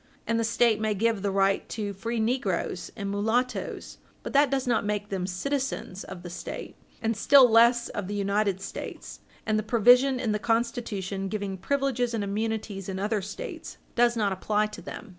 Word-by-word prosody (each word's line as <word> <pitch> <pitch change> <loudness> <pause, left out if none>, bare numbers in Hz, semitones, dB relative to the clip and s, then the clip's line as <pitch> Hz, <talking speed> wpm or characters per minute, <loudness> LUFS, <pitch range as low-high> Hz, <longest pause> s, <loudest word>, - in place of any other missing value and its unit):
And 230 0 0
the - - +1
State 230 -1 +2
may 215 -1 0
give 220 0 +1
the 200 - 0
right 195 0 +1
to 205 -2 -3
free 230 +4 -3
negroes 220 -6 -1
and 200 -3 -4
mulattoes, 225 +5 -1 0.2
but - - -6
that 285 0 +5
does 270 0 0
not 240 -3 +1
make 210 0 -2
them 185 -2 -2
citizens 255 -1 -3
of 185 -2 -9
the 175 - -7
State, - - -7 0.3
and 225 0 +1
still 270 +5 +7
less 235 +1 +5
of 205 -4 -4
the 205 - -4
United 200 -1 0
States. - - -7 0.3
And 215 0 +1
the - - 0
provision 245 +4 +5
in 230 -4 0
the 210 - 0
Constitution 220 -4 -1
giving 200 -1 -3
privileges 250 +2 0
and 215 - -1
immunities 205 -1 -3
in 190 - -3
other 205 +2 0
States 440 - -7 0.2
does 240 0 +3
not 205 -3 +1
apply 210 +3 +1
to - - -8
them. 230 - -8
215 Hz, 185 wpm, -27 LUFS, 200-235 Hz, 0.3 s, still